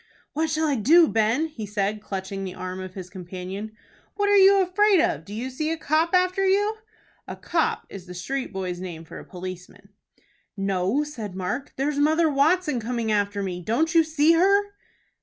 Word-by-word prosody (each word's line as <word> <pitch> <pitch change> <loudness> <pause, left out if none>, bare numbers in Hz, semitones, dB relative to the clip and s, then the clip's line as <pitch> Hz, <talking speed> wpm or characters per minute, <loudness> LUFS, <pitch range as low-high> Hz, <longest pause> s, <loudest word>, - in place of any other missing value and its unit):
"What 315 +2 0
shall 315 +1 0
I 285 -3 +1
do, 320 +10 +6
Ben?" 225 +7 +1
he 240 -10 -7
said, 205 +1 -2
clutching 195 -1 -5
the 185 -1 -6
arm 185 0 -6
of 185 -1 -8
his 185 -2 -7
companion. 185 +3 -7 0.4
"What 405 0 +1
are 410 - +5
you 395 0 +7
afraid 385 +1 +3
of? 155 - +1
Do 200 - -12
you 240 +5 -4
see 305 +5 -2
a 325 - -1
copp 320 +3 +1
after 365 +1 +2
you?" 410 +3 +2 0.5
A - - -6
"copp" - - -1
is 190 -2 -10
the 180 - -9
street 265 +9 -4
boy's 185 -2 -4
name 170 -3 -7
for - - -10
a - - -10
policeman. 180 -1 -9 0.7
"No," 195 +7 0
said 225 -10 -7
Mark; 190 +9 -4
"there's 285 +2 -1
Mother 315 +2 +3
Watson 300 0 +2
coming 230 -1 -2
after 205 -1 0
me. 180 -2 -4
Don't 255 - 0
you 330 -1 +6
see 310 0 +3
her?" 400 +4 +3
250 Hz, 190 wpm, -24 LUFS, 190-320 Hz, 0.7 s, you